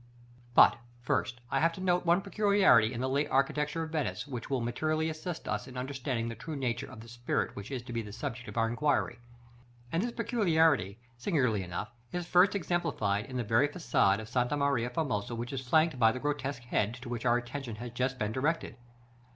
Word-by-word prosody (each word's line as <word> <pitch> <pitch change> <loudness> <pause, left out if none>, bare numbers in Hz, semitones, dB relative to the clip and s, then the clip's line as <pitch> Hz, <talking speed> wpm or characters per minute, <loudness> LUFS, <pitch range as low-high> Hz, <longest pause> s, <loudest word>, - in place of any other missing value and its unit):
§ - - -24
XVII. 120 0 -26
But, 120 - +7 0.3
first, 120 0 -1
I - - +2
have 165 +1 +3
to - - -9
note 180 -1 +1
one 175 +3 +4
peculiarity 200 - +4
in 120 -1 -4
the 130 - 0
late 140 +3 0
architecture 150 +4 +1
of 160 - -6
Venice, 125 - -2
which 125 -4 -6
will 135 -2 +1
materially 155 +7 0
assist 160 +2 -6
us 105 0 -2
in 130 -1 -9
understanding 130 -2 -2
the 115 - -3
true 155 +6 -6
nature 125 -4 -2
of 110 - -10
the 115 - -12
spirit 120 +1 -2
which 100 +1 -7
is 130 -3 -4
to 120 -1 -8
be 115 - -1
the 105 -2 -8
subject 125 +1 -5
of - - -9
our 115 0 +3
inquiry; 120 0 0 0.7
and 165 - +1
this 240 +3 -1
peculiarity, 165 - +2 0.2
singularly 125 - +1
enough, 90 +4 -5 0.2
is 175 -1 -3
first 180 +4 +4
exemplified 155 - 0
in 130 -2 -5
the 125 - 0
very 115 +6 +3
façade 145 - +2
of 110 - -7
Santa 125 +4 0
Maria 140 -4 +1
Formosa 125 -6 -2
which 120 +3 -5
is 135 - -2
flanked 155 -1 +3
by 115 -2 +6
the 130 - -5
grotesque 140 -3 -2
head 115 -2 0
to 125 +1 -10
which 120 -1 -4
our 120 -1 +4
attention 120 -1 -5
has 120 +2 -7
just 125 +2 -1
been 105 -3 -1
directed. 135 0 -1
130 Hz, 215 wpm, -31 LUFS, 120-155 Hz, 0.7 s, But